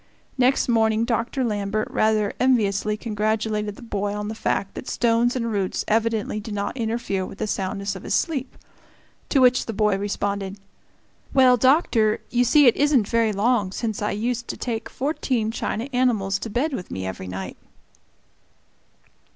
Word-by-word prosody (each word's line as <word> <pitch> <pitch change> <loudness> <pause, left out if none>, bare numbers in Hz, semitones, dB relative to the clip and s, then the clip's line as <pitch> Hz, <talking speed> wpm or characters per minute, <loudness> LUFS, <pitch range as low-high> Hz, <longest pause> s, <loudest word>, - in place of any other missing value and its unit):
Next 255 +1 +2
morning 225 -1 +2
Dr. 240 +2 -1
Lambert 210 -1 -1
rather 215 -2 +1
enviously 210 -5 +2
congratulated 210 -1 -1
the - - -13
boy 205 -2 -2
on 210 0 -4
the - - -3
fact 200 -2 -2
that - - -8
stones 235 +1 +2
and 230 -2 -1
roots 195 -3 -1
evidently 220 -1 0
did 210 0 -6
not 200 +3 -3
interfere 225 -5 -2
with 190 - -8
the - - -2
soundness 200 0 -3
of 190 - -8
his - - -1
sleep; 275 -6 -2 0.7
to - - +2
which 250 -1 +4
the 225 - -3
boy 210 -1 +2
responded, 200 -1 -2 0.8
"Well, 260 -2 +7
Doctor, 245 -5 +3
you 245 0 +3
see 290 +4 +5
it 240 - +5
isn't 280 -7 +3
very 230 -2 +2
long 210 -1 +1
since 220 +1 -3
I 210 - 0
used 235 +3 -2
to - - -5
take 225 -2 -4
fourteen 255 -5 -1
china 225 +1 -3
animals 215 -6 +1
to 225 - -5
bed 270 +8 -1
with 185 -8 -5
me 95 0 -4
every 95 0 -5
night!" 95 0 -6
220 Hz, 165 wpm, -23 LUFS, 205-245 Hz, 0.8 s, Well